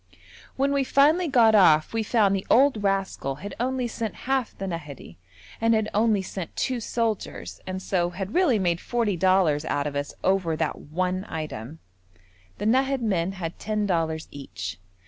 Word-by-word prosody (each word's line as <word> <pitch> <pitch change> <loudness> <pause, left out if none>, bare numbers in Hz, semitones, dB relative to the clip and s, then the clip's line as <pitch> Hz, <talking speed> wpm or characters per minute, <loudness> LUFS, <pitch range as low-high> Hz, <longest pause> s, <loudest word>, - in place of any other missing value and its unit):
When 275 +1 +1
we 280 -1 +2
finally 305 +7 +3
got 235 -6 +5
off 160 -6 +5
we 225 - 0
found 210 -3 +2
the 190 - -4
old 260 -3 +4
rascal 195 -8 -1
had 200 +8 -8
only 255 0 -1
sent 225 -2 -4
half 265 -2 -1
the 195 - -4
Nahadi 150 - -7 0.4
and 225 0 +4
had 220 -1 0
only 210 -2 +2
sent 185 -2 -6
two 255 -2 -1
soldiers, 225 -2 -3
and 185 0 -3
so 175 -2 0
had 190 +3 -6
really 345 -11 +3
made 175 -3 0
forty 230 -5 0
dollars 175 -4 +3
out 145 -2 -1
of 145 -1 -3
us 145 0 -3
over 185 -4 +1
that - - -2
one 185 +4 -2
item. 155 -3 -6 0.8
The - - -4
Nahad 265 +3 +2
men 190 -5 0
had 170 -3 -6
ten 215 0 -1
dollars 165 -4 -1
each. 100 -10 -7
195 Hz, 170 wpm, -25 LUFS, 165-230 Hz, 0.8 s, got